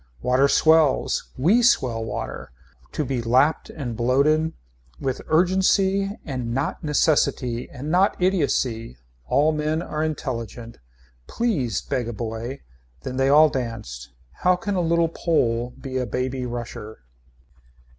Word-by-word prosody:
Water 130 +2 +3
swells. 155 - +3
We 195 - +4
swell 125 - +2
water. 110 - -6 0.4
To 150 - -1
be 130 -2 -2
lapped 130 +7 +2
and 125 -7 -5
bloated. 140 +7 +2 0.5
With 130 -1 -3
urgency 190 +3 +2
and 125 -5 -4
not 135 - -2
necessity 140 -5 +1
and 140 +4 -6
not 185 +3 +2
idiocy. 135 - 0 0.3
All 150 - +3
men 155 +2 -1
are 155 -3 -3
intelligent. 120 -6 -5 0.5
Please 155 - -1
beg 125 -4 -2
a 120 - -4
boy. 115 +4 -5 0.4
Then 130 - -5
they 135 0 +2
all 150 +2 +7
danced. 115 - -5 0.3
How 180 0 +4
can 205 +3 -3
a 185 - +1
little 170 0 +2
Pole 120 -8 0
be 130 -1 -5
a 125 -1 -1
baby 125 +3 -2
rusher. 115 - -7
135 Hz, 130 wpm, -23 LUFS, 120-160 Hz, 0.5 s, all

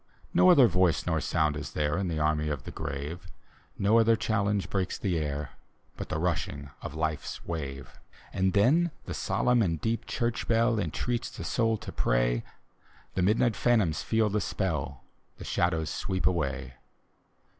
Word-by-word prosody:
No 185 - +6
other 145 -8 +8
voice 90 -3 +2
nor 80 -3 0
sound 75 -3 +1
is 75 - -6
there,. 75 0 0
In 95 -1 -1
the 80 -2 -2
army 75 0 +1
of 70 -4 -3
the - - -7
grave; 75 +4 -5 0.5
No 105 +4 +4
other 115 0 +5
challenge 105 -3 0
breaks 95 -2 -2
the 90 -5 -1
air, 75 -1 -3 0.4
But - - -7
the - - -1
rushing 75 -4 -2
of - - -6
Life's 80 -2 -3
wave. 70 -6 -6 0.3
And 95 0 +1
then 145 +13 +4 0.2
the - - -5
solemn 125 -1 +1
and 85 -6 0
deep 115 +4 -2
church 120 -2 -2
bell 115 0 +3
Entreats 120 +7 -2
the - - -8
soul 115 -2 +1
to - - -8
pray, - - +1 0.7
The 95 - 0
midni^t 110 +5 +3
phantoms 105 -10 +2
feel 110 -1 +1
the 105 +1 0
spell. 75 - -2 0.3
The - - -9
shadows 80 -3 0
sweep 95 0 -2
away. 70 -7 -1
90 Hz, 165 wpm, -28 LUFS, 75-110 Hz, 0.7 s, other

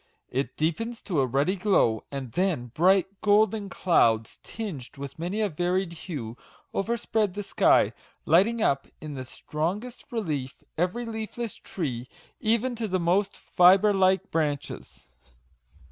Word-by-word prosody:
It 135 +2 -2
deepens 225 +10 -1
to 175 -8 -1
a 130 - +1
ruddy 140 +9 +1
glow; 180 - +2
and 135 -4 -5
then 160 -8 -1
bright, 190 +4 +2
golden 210 0 +3
clouds, 115 -13 +2
tinged 175 - -7
with 140 +2 -8
many 180 +6 -2
a 210 - +2
varied 180 +2 -1
hue, 145 - -6 0.4
overspread 215 -2 0
the 205 - -3
sky, - - +3 0.3
lighting 210 +8 +4
up 135 -1 +1
in 155 -1 -7
the 130 -2 -6
strongest 185 - -4
relief 150 - -3 0.2
every 180 +8 -1
leafless 225 0 -4
tree, 125 -9 -5 0.3
even 235 +2 +1
to 225 -1 -2
the 185 -1 0
most 190 +4 +1
fibre 190 +4 +5
like 190 0 +2
branches. 150 - -3
185 Hz, 135 wpm, -27 LUFS, 145-210 Hz, 0.4 s, fibre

